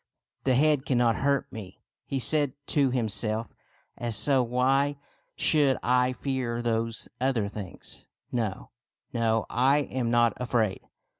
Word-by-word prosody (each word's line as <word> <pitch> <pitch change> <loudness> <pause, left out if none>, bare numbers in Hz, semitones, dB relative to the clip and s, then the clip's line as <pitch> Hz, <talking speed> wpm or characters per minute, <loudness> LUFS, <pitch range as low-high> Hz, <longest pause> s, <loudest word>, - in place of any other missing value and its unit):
'* - - -55
The 130 -1 +3
head 150 0 +3
cannot 120 -5 +1
hurt 140 0 +1
me," 100 -4 -10 0.3
he 135 - -2
said 145 +2 +3 0.2
to 140 -3 +3
himself; 110 -2 0 0.2
" - - -38
and 120 -1 -3
so 130 +6 +3
why 135 +4 +1 0.4
should 145 -4 +3
I 125 +1 +2
fear 125 -3 -3
those 115 -1 -1
other 125 -5 0
things? 100 -3 -9 0.2
No, 110 -5 -3 0.4
no, 115 -2 +1
I 135 +5 +2
am 125 -3 -1
not 120 -1 +3
afraid." 115 -5 -1
125 Hz, 140 wpm, -27 LUFS, 115-135 Hz, 0.4 s, The